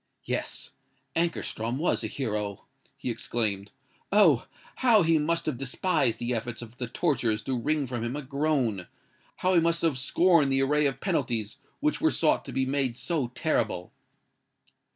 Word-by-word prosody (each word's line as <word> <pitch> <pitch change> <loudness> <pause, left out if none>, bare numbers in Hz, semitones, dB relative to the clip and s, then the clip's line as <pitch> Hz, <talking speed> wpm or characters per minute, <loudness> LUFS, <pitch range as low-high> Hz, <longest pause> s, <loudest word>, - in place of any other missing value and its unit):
"Yes—Ankarstrom 130 -3 -4
was 165 +5 0
a - - -1
hero!" 105 -6 -3 0.3
he 125 - -3
exclaimed. 110 -4 -2 0.4
"Oh! 185 - +5 0.3
how 230 -6 +5
he 165 -1 +3
must 165 +3 0
have 145 -6 -2
despised 135 -1 +1
the 120 +1 -2
efforts 120 0 -4
of 120 +2 -13
the 125 - -2
torturers 115 -6 0
to 130 +3 -1
wring 150 +4 0
from 120 -3 -4
him 120 +3 -2
a 150 - -4
groan:—how 140 - -2
he 175 - +6
must 170 0 +1
have 155 -6 +1
scorned 165 +1 +3
the 135 0 +3
array 150 +2 +3
of 135 -1 -4
penalties 120 - -1 0.2
which 300 +1 +1
were 320 - +4
sought 160 - +2
to - - -7
be 130 - 0
made 130 -3 0
so 155 -6 -1
terrible! 110 - -1
135 Hz, 155 wpm, -28 LUFS, 120-160 Hz, 0.4 s, he